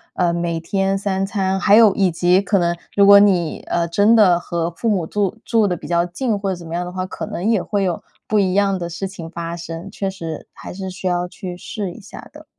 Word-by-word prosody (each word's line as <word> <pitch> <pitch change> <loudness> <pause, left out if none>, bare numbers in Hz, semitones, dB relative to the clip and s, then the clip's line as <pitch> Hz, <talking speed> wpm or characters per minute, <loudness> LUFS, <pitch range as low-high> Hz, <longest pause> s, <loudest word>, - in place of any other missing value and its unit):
呃， 175 -2 +1
每 170 -1 -2
天 195 +3 0
三 195 -1 -1
餐 190 -1 -1
还 205 +1 +5
有 220 -3 +7
以 195 -2 +2
及 175 +2 +3
可 200 0 +1
能 175 -1 +1 0.2
如 200 - +5
果 200 0 +9
你， 185 -5 +2
呃， 170 0 0
真 205 +7 +4
的 185 -6 +5
和 170 -1 -3
父 225 +7 -2
母 190 -6 0
住 200 +3 -2
住 225 -3 +2
得 180 -2 -1
比 150 - -10
较 170 +1 +2
近 210 +4 -2
或 200 -1 -2
者 - - -2
怎 175 -1 -11
么 165 - -7
样 175 +1 -1
的 180 - -6
话， 185 0 -3
可 - - -6
能 180 +5 -3
也 220 -4 +2
会 200 +2 -1
有 180 -3 -1 0.3
不 215 - +2
一 190 -2 +1
样 195 -1 +2
的 170 -1 -4
事 170 +3 -4
情 170 -4 -9
发 170 0 -5
生， 170 +2 -7
确 195 -2 -3
实 165 -5 -7
还 - - -9
是 190 +1 -6
需 185 +1 -9
要 180 -1 0
去 180 0 -8
试 195 +1 -5
一 200 - -12
下 200 - -11
的。 - - -13
185 Hz, 270 characters per minute, -20 LUFS, 170-200 Hz, 0.3 s, 果